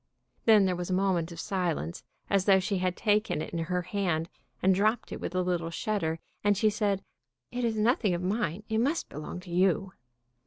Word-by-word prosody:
Then 215 -3 +7
there 185 -1 +1
was 175 0 -4
a - - 0
moment 180 -3 +1
of 170 - -8
silence, 170 - -2 0.2
as 195 -2 +2
though 195 -2 +6
she 190 +1 -1
had 180 -1 -1
taken 210 -5 +1
it 155 - -5
in 170 - -1
her 180 +2 -1
hand, 175 -3 -1 0.3
and 190 +1 +4
dropped 215 +5 +1
it - - -5
with 180 - -4
a 185 - +2
little 175 -2 -1
shudder, 165 -2 -1 0.3
and 205 -1 +3
she 215 +1 +3
said, 200 -2 0 0.5
"It 245 0 -3
is 225 -2 0
nothing 215 -3 +2
of 175 - -4
mine. 195 -1 -1
It 220 0 0
must 285 +8 0
belong 150 +4 -6
to 180 -1 -11
you." 185 +1 +2
190 Hz, 205 wpm, -29 LUFS, 175-210 Hz, 0.5 s, Then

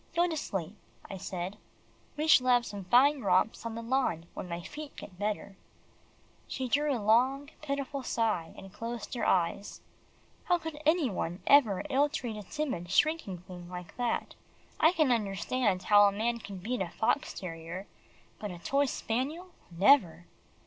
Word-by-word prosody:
"Go 345 +1 +4
to 330 - -2
sleep," 195 - -4 0.4
I 195 - -5
said, 185 +2 -5 0.6
"we 305 - 0
shall 260 -5 +6
have 245 -1 +4
some 200 -2 -7
fine 265 +7 +5
romps 200 +3 +1
on 225 - -6
the 230 - -5
lawn 230 -10 0
when 180 - -7
my 170 0 -4
feet 300 - -8
get 180 -2 -11
better." 205 -1 -3 0.9
She 260 -1 -3
drew 290 +4 +2
a 265 - +1
long, 255 +7 +2
pitiful 280 -1 -3
sigh, 220 -9 -1
and 195 0 -11
closed 230 +1 -6
her 245 - -3
eyes. 185 +2 0 0.6
How 355 - +3
could 320 -2 -7
any 315 -6 +3
one 175 -1 -4
ever 235 -10 +5
ill 285 +1 +2
treat 245 -7 -4
a 210 - -6
timid 210 - -4
shrinking 205 - +1
thing 180 -1 -10
like 180 -1 -8
that. 245 -1 -1 0.5
I 320 - +6
can 310 -7 +2
understand 205 -1 0
how 205 +1 +7
a - - +2
man 230 +4 -1
can 200 -3 -8
beat 220 +4 -3
a 180 - -2
fox 220 - 0
terrier 170 +1 -6 0.5
but 210 - -4
a 180 - -7
toy 275 +11 +1
spaniel 285 +11 -3 0.2
never! 175 - +4
225 Hz, 170 wpm, -30 LUFS, 185-280 Hz, 0.9 s, how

